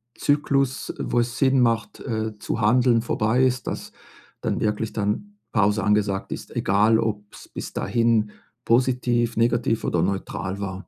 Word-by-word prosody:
Zyklus, 140 -2 0
wo 120 - 0
es 120 -1 -3
Sinn 135 -1 +3
macht, 115 -2 0
äh, 110 -2 -3
zu 115 - -3
handeln 120 +2 +4
vorbei 120 +2 +1
ist, 130 0 -1
dass - - -5 0.5
dann - - -2
wirklich 105 +1 -1
dann 115 - -3 0.2
Pause 105 -1 +2
angesagt 100 -2 0
ist, - - -9
egal 105 +3 +3
ob's 105 -2 -4
bis - - -7
dahin 115 -3 +1 0.3
positiv, 120 -1 +2
negativ 115 -1 +1
oder 85 - +1
neutral 100 +1 -3
war. 95 0 -5
115 Hz, 145 wpm, -23 LUFS, 105-120 Hz, 0.5 s, handeln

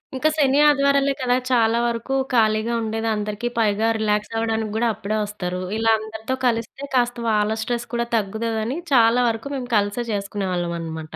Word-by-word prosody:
ఇంకా 310 +4 +2
శని 280 -1 +3
ఆదివారాలే 280 -1 +3
కదా! 250 -1 +2 0.2
చాలా 230 -1 +3
వరకు 235 +3 -2 0.2
ఖాళీగా 220 0 +2
ఉండేది 225 0 -2
అందరికి 210 +3 -3
పైగా 215 0 +2
రిలాక్స్ 210 0 0
అవ్వడానికి 225 -1 -1
గూడా 235 +1 +2
అప్పుడే 215 +3 -3
వస్తారు. 180 -3 -4 0.2
ఇలా 225 0 +3
అందరితో 220 +3 -4
కలిస్తే 235 +4 -2
కాస్త 240 -1 +1
వాళ్ళ 210 0 +1
స్ట్రెస్ 240 +1 -3
కూడా 235 0 0
తగ్గుతుందని. 220 +5 -2 0.2
చాలా 235 0 +5
వరకు 225 +5 -4
మేము 250 -2 -5
కలిసే 205 +4 0
చేసుకునేవాళ్ళం 190 -4 -2
అనమాట. 160 -1 -7
225 Hz, 155 wpm, -22 LUFS, 210-240 Hz, 0.2 s, చాలా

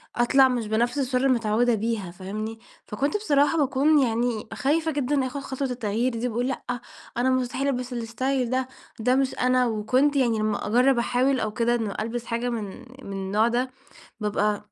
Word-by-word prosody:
أطلع 265 +3 +5
مش 245 -4 -2
بنفس 235 +4 0
الشرارة 260 -1 +1
اللي 265 - +5
متعودة 230 +2 +2
بيها 215 -4 -2
فاهمني؟ 215 +5 -6 0.3
فكنت 280 - -1
بصراحة 295 -6 +2
باكون 290 +1 +3
يعني 235 -3 0
خايفة 315 +7 +1
جدًا 280 -2 0
آخد 280 +2 -5
خطوة 270 0 -3
التغيير 240 0 -1
دي، 235 +2 -1
باقول 245 +1 -1
لأ، 265 - -3 0.5
أنا 250 +2 +2
مستحيل 255 +1 0
ألبس 250 -2 -2
الاستايل 245 +2 -1
ده، 255 +1 0 0.3
ده 250 +3 +2
مش 270 -1 +1
أنا، 250 0 +3
وكنت 250 +6 +1
يعني 235 -5 +2
لمّا 215 -1 -1
أجرب 250 +4 +4
أحاول 255 +3 +1
أو 215 -2 -1
كده، 235 +2 +1
إن 225 -4 -2
ألبس 230 +2 -3
حاجة 235 +2 -2
من 230 -3 -2 0.4
من 200 - -7
النوع 195 +3 +1
ده، 245 +2 0 0.5
بابقى 210 0 -1
245 Hz, 175 wpm, -25 LUFS, 220-265 Hz, 0.5 s, أطلع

